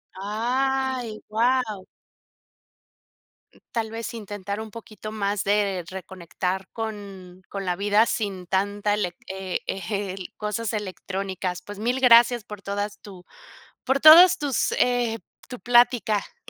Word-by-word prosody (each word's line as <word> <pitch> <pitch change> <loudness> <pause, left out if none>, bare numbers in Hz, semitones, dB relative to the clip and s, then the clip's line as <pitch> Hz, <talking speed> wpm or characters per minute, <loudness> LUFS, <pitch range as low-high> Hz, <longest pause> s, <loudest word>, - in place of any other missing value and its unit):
Ay, 245 +3 -1
wau. 220 -3 0 1.9
Tal 225 -1 -1
vez 230 +1 -5
intentar 205 -2 -6
un 220 -1 -7
poquito 215 -1 -9
más 205 -1 -1
de 200 -3 +1
reconectar 190 0 -4
con 200 -5 -7
con 195 -1 -5
la 180 -1 0
vida 205 +3 +3
sin 195 -6 -3
tanta 205 +2 0
elec, 180 -4 -2
eh, 190 -1 -4
eh, 195 0 -3
el, 185 - -8
cosas 210 +1 -3
electrónicas, 190 -2 -4
pues, 205 0 -10
mil 245 +4 0
gracias 240 -2 +6
por 210 -1 -10
todas 205 +1 -4
tu 190 -3 -12 0.6
por 270 +1 +1
todas 340 +5 +9
tus, 285 -5 0
eh, 240 -2 +1 0.3
tu 250 - -8
plática. 240 - +2
210 Hz, 125 wpm, -24 LUFS, 195-230 Hz, 1.9 s, todas